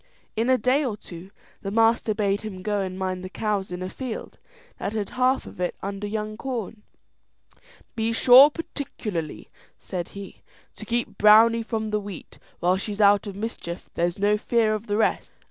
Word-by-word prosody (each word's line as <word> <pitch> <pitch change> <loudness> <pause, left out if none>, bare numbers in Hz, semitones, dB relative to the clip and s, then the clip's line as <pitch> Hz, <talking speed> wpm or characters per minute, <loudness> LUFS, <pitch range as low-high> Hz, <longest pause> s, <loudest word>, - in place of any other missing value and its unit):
In 230 +3 0
a 260 - +5
day 255 +6 +2
or 230 -6 -2
two 175 -1 -11 0.3
the 195 - -4
master 225 0 +2
bade 200 -2 0
him 190 -4 -7
go 205 -1 0
and 185 -1 -4
mind 185 -1 -3
the 185 - -6
cows 200 -2 -2
in 180 +1 -4
a - - -3
field 255 -4 -6 0.4
that 205 - -3
had 210 -3 -3
half 255 +1 +1
of - - -12
it 180 -1 -1
under 200 +1 -4
young 215 0 -4
corn. 230 -4 -5 1.1
"Be 225 0 0
sure, 255 +4 +8
particularly," 220 - -5 0.3
said 175 -2 -5
he, 200 -1 -9 0.3
"to - - -9
keep 235 0 -2
Browney 225 +2 +6
from 220 -2 -3
the 210 - +1
wheat; 200 -3 -9 0.2
while 180 +2 +3
she's 205 +1 -5
out 205 0 +5
of 200 - -6
mischief 200 -5 -6
there's 175 0 0
no 205 +1 +2
fear 225 -1 +2
of 215 +1 -4
the 205 0 0
rest." 220 - +1
210 Hz, 180 wpm, -25 LUFS, 195-230 Hz, 1.1 s, sure